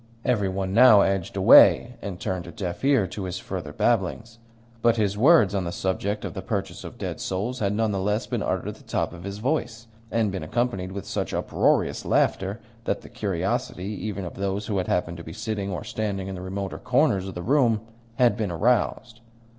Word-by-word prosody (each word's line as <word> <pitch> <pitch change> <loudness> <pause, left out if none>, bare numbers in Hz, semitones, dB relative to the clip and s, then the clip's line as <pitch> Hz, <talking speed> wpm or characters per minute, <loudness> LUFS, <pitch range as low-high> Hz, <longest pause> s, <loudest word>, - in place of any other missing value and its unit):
Every 105 -6 +1
one 95 0 -3
now 115 -2 +8
edged 95 -3 0
away, 125 - +7
and 95 -3 -6
turned 90 -2 -3
a - - -7
deaf 90 +3 -5
ear 135 -7 +4
to 95 +2 -6
his 90 0 -4
further 90 -5 -6
babblings; 115 +8 -1 0.4
but 115 0 +4
his 100 -2 +1
words 120 - +5
on 95 -2 0
the 85 - -3
subject 100 +3 -2
of - - -5
the - - -5
purchase - - -4
of - - -9
dead - - -5
souls 110 +7 -3
had 100 -1 0
none 110 0 +1
the 100 - -1
less 105 +3 0
been - - -3
uttered - - -2
at - - -7
the - - -18
top - - -2
of 85 0 -10
his 100 +1 -5
voice, 120 -2 -2 0.2
and 110 -3 +1
been 95 - -4
accompanied 95 +1 -2
with 100 -1 -6
such - - -3
uproarious - - +1
laughter 95 +3 +1 0.3
that - - -1
the - - -13
curiosity 95 -3 -2
even 100 -3 -4
of 85 - -6
those 100 +1 -2
who 100 -3 -1
had 90 - -2
happened 85 -1 -1
to 85 - -8
be 80 - -9
sitting 110 -1 -3
or 90 - -4
standing 100 -3 -3
in 95 - -5
the 90 - -7
remoter 95 -3 -4
corners 95 0 +2
of 95 - -7
the 90 - -5
room 120 -4 +3 0.3
had 120 0 +4
been 110 -4 -2
aroused. 120 +4 0
100 Hz, 210 wpm, -25 LUFS, 95-115 Hz, 0.4 s, now